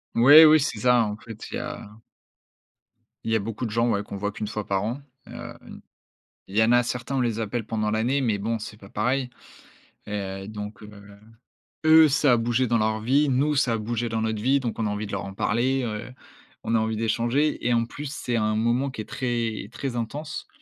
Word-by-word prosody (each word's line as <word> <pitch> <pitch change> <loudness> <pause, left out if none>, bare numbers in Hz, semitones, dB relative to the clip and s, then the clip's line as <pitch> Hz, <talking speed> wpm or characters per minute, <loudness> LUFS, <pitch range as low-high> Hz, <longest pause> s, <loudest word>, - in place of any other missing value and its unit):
Oui, 145 +7 +9
oui, 155 0 +7
c'est 110 - -2
ça. 125 -1 +4
En 105 0 -4
fait, 110 -1 -10
il - - -4
y - - -3
a 105 - -7 1.4
il 115 - -1
y - - +3
a - - +3
beaucoup 110 +3 -4
de 110 - -4
gens, 115 +2 +1
ouais, 100 -2 0
qu'on 100 - -7
voit 105 +1 -2
qu'1 105 +1 -5
fois 105 0 -5
par 95 0 0
an. 120 +6 -3 0.3
Hem, 120 0 -9 0.9
il 100 +3 -3
y 110 - +6
en 115 - +3
a 120 0 +5
certains, 125 +3 -4
on - - +1
les 115 -2 0
appelle 115 +1 -3
pendant 110 -1 -2
l'année 125 +6 +1
mais 110 -4 0
bon, 115 +3 -2
c'est 105 0 -8
pas 100 - -14
pareil 125 +4 -1 0.8
et 105 - -9
heu 95 -1 -4
donc 105 0 -7
heu, 105 - -10 1.0
eux, 160 -1 +7
ça 140 -2 +3
a - - +4
bougé 120 +2 +1
dans 115 0 +2
leur 110 0 0
vie. 140 +5 +2
Nous, 145 +3 +1
ça 125 -4 +2
a - - 0
bougé 115 +2 -2
dans 110 0 -2
notre 110 -1 -2
vie 135 +4 +3
donc 120 -3 -4
on 110 - 0
a - - -1
envie 105 +1 -3
de 100 - -9
leur 100 - -2
en 95 - -7
parler. 125 +6 0
Heu, 110 +2 -5 0.5
on 115 - 0
a - - +4
envie 110 0 -1
d'échanger 120 +6 0
et 120 - +3
en 115 0 +2
plus, 145 +3 -7
c'est 120 -4 -3
un 110 0 +1
moment 120 +5 +1
qui 110 - -6
est - - -8
très, 120 -3 -2
très 135 -3 -4
intense, 145 +7 -5
115 Hz, 235 wpm, -25 LUFS, 110-125 Hz, 1.4 s, Oui